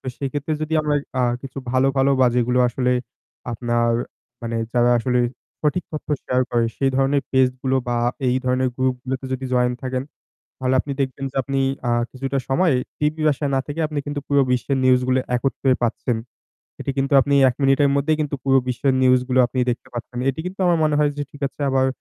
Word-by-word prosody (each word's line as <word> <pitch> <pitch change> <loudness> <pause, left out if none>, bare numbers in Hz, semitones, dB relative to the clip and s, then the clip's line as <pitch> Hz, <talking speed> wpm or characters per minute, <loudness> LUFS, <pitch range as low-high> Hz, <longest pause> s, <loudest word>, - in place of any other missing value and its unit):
তো - - -14
সেক্ষেত্রে 145 +2 -3
যদি 155 - -4
আমরা 150 -1 0 0.3
আ - - +3 0.2
কিছু 135 0 -7
ভালো 130 +1 +3
ভালো 135 +1 +3
বা 130 - +6
যেগুলো 125 +1 +2
আসলে 125 +1 0 0.6
আপনার 120 0 0 0.5
মানে 115 0 -3 0.2
যারা 120 0 +4
আসলে 125 +1 +1 0.4
সঠিক 155 +5 0
তথ্য 155 - -6 0.2
শেয়ার 125 0 +1
করে 120 -1 +2
সেই 135 -1 +2
ধরনের 135 +1 +2
পেজ 130 -1 +5
গুলো 130 0 +1
বা 120 - 0 0.3
এই 125 - +2
ধরনের 130 0 +1
গ্রুপ 130 -1 +1
গুলোতে 130 0 -4
যদি 130 0 -3
জয়েন 125 0 +2
থাকেন 130 0 -2 0.6
তাহলে 130 0 0
আপনি 140 - -5
দেখবেন 135 0 -2
যে - - -14
আপনি 135 +1 -2 0.3
আ - - +2 0.2
কিছুটা 135 +1 -3
সময় 160 +5 +3 0.3
টিভি 150 +1 0
ভাষায় 145 -1 0
না - - +2
থেকে 145 +2 -4
আপনি 150 -1 -4
কিন্তু 145 0 -3
পুরো 140 -1 +4
বিশ্বের 125 +2 0
নিউজ 130 -1 +5
গুলো 130 0 +3 0.2
একত্রে 135 +1 0
পাচ্ছেন। 120 +1 0 0.6
এটি - - -2
কিন্তু 135 +1 0
আপনি 140 +2 +1
১ 125 - -1
মিনিটের 135 +1 +4
মধ্যেই 150 +3 +2
কিন্তু 150 -1 -1
পুরো 135 -1 +4
বিশ্বের 130 +2 +1
নিউজ 130 0 +5
গুলো 130 0 +2
আপনি 130 - -6
দেখতে 120 - -5
পাচ্ছেন। 120 +1 -6
এটি 135 +3 -1
কিন্তু 185 +2 -6
আমার 175 -1 +3
মনে 150 - +2
হয় 150 -1 +3
যে - - 0
ঠিক 145 - -14
আছে - - -21
আবার 130 0 +2
135 Hz, 200 wpm, -22 LUFS, 125-140 Hz, 0.6 s, বা